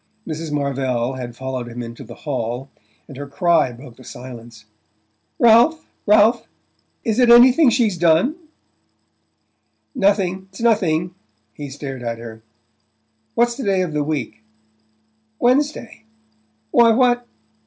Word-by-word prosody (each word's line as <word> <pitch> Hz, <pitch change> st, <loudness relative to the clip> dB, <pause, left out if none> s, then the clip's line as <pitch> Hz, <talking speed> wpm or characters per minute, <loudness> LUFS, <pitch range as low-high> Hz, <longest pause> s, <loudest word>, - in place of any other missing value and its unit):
Mrs. 160 Hz, -1 st, -5 dB
Marvell 135 Hz, -4 st, -1 dB
had 125 Hz, -2 st, -7 dB
followed 130 Hz, -1 st, -5 dB
him 120 Hz, +1 st, -7 dB
into 115 Hz, 0 st, -9 dB
the -, -, -11 dB
hall, 130 Hz, -1 st, -4 dB, 0.4 s
and 135 Hz, -, -11 dB
her 145 Hz, 0 st, -7 dB
cry 165 Hz, -3 st, +1 dB
broke 120 Hz, 0 st, -13 dB
the 130 Hz, -, -15 dB
silence. 120 Hz, -3 st, -11 dB, 0.7 s
"Ralph 240 Hz, +8 st, +4 dB, 0.2 s
Ralph 215 Hz, +3 st, +4 dB, 0.6 s
is 225 Hz, 0 st, -1 dB
it 245 Hz, -1 st, +4 dB
anything 250 Hz, +5 st, +7 dB
she's 225 Hz, -7 st, +1 dB
done?" 170 Hz, -, +3 dB, 1.6 s
"Nothing 195 Hz, -5 st, 0 dB
it's 190 Hz, -, -14 dB
nothing." 180 Hz, -7 st, +1 dB, 0.4 s
He 145 Hz, +5 st, -8 dB
stared 135 Hz, -1 st, -7 dB
at 115 Hz, -1 st, -4 dB
her. 115 Hz, -1 st, -10 dB, 0.9 s
"What's 240 Hz, +1 st, +2 dB
the 265 Hz, -, -6 dB
day 195 Hz, -3 st, +1 dB
of 170 Hz, -4 st, -5 dB
the 150 Hz, -1 st, 0 dB
week?" 140 Hz, -8 st, -4 dB, 1.0 s
"Wednesday. 250 Hz, -, 0 dB, 0.7 s
Why, 235 Hz, -1 st, +5 dB
what 245 Hz, 0 st, +2 dB
160 Hz, 125 wpm, -20 LUFS, -, 1.6 s, anything